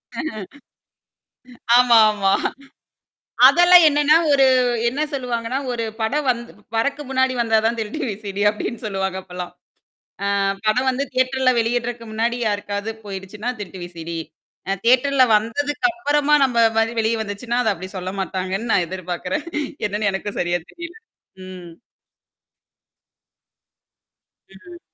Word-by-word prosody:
ஆஹ. - - -3 1.6
ஆமா, 245 -1 +6
ஆமா. 195 -2 +1 1.1
அதெல்லாம் 350 0 +7
என்னன்னா, 295 +1 +4 0.2
ஒரு 275 -1 +5 0.4
என்ன 265 +5 -3
சொல்லுவாங்கன்னா, 250 -2 -2
ஒரு 230 -1 -3 0.2
படம் 275 +6 -1
வந் 235 -2 +2 0.4
வரக்கு 280 +6 -1
முன்னாடி 260 -1 +1
வந்தா 225 -1 +2
தான் 235 +1 0
திருட்டு 220 +8 -4
விசிடி 205 0 -5
அப்படின்னு 215 +2 -5
சொல்லுவாங்க 190 -2 -2
அப்பலாம். 180 -1 -8 0.9
ஆ - - +1 0.3
படம் 250 +5 +2
வந்து 265 +2 -2
தியேட்டர்ல 255 0 +2
வெளியிடறக்கு 235 0 -2
முன்னாடி 235 +2 -1
யாருக்காவது 205 +1 -3
போயிடுச்சுன்னா 200 +4 -6
திருட்டு 190 -1 -8
விசடி. 170 -1 -7 0.5
அ - - +2
தியேட்டர்ல 260 +2 +4
வந்ததுக்குப்புறமா 290 - 0
நம்ம 250 -3 0 0.2
மாரி 225 +1 +1
வெளிய 220 +1 +1
வந்துச்சுன்னா, 230 +4 -3
அத 220 -3 +1
அப்படி 185 +1 -9
சொல்ல 185 0 -4
மாட்டாங்கன்னு 190 +4 -3
நான் 175 - +2
எதிர்பார்க்குறேன். 185 - -4 0.4
என்னன்னு 205 0 -1
எனக்கும் 195 +1 -5
சரியா 175 0 0
தெரியல. 345 0 -9 0.5
ம். 180 -2 -10 2.8
ம். 340 - -14
230 Hz, 120 wpm, -21 LUFS, 195-265 Hz, 2.8 s, அதெல்லாம்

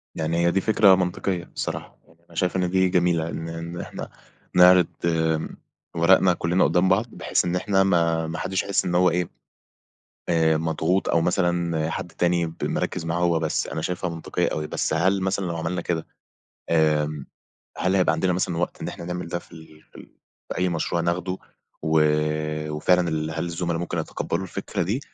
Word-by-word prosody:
يعني 80 +1 -1
هي 85 - +4
دي 95 - +1
فكرة 105 -2 +5
منطقية 90 0 -1
بصراحة، - - -5
يعني 80 - -24
أنا 85 - -18
شايف 90 +2 0
إن 90 -1 +1
دي 95 0 +3
جميلة 85 -2 +1
إن 80 0 -5
إن 85 +1 -6
إحنا - - -7 0.5
نعرِض 90 -1 +7 0.2
آمم 80 -2 0 0.4
ورقنا 90 +2 +5
كلّنا 85 +2 +1
قدّام 90 +1 +3
بعض 95 +5 +3
بحيث - - 0
إن 90 0 -1
إحنا 95 +1 +2
ما 85 -3 +2
ما 80 - -4
حدّش 95 -1 -1
يحس 100 - 0
إن 90 - -1
هو 90 +1 +5
إيه 90 0 -1 1.0
آآ، 80 -2 +3
مضغوط 80 +3 0
أو 85 - +3
مثلًا 85 -2 0
حد 85 - -5
تاني 85 0 +1
ب 80 0 -8
مركِّز 80 - -2
معاه 85 +1 -1
هو 85 -2 +2
بس، 80 -1 -1
أنا 80 - -4
شايفها 90 +1 -2
منطقيّة 85 -1 -2
أوي، 75 0 -3
بس - - -1
هل 95 +4 +2
مثلًا 95 +1 -1
لو 85 -1 -3
عملنا 80 +2 -2
كده 80 -2 -2 0.6
آمم، 75 -3 +1 0.5
هل 95 +1 +1
هيبقى 90 -3 +3
عندنا 90 +3 +1
مثلًا 90 -1 -1
وقت 85 - -2
إن - - -4
احنا 85 - -7
نعمل 90 0 -4
ده 85 +1 -3
في - - -21
ال 80 -2 -14
في - - -31
ال - - -13 0.4
في - - -3
أي 90 0 +1
مشروع 85 0 -1
ناخدوا 90 +2 -1 0.4
و 80 - -2 0.9
و - - -4
فعلًا 90 +1 +3
ال 80 0 -2
هل 80 +1 -3
الزُّملا 85 0 -2
ممكن 85 0 -3
يتقبّلوا 85 +2 -3
الفكرة 95 +1 -3
دي 105 +9 -1
85 Hz, 190 wpm, -24 LUFS, 80-90 Hz, 1.0 s, نعرِض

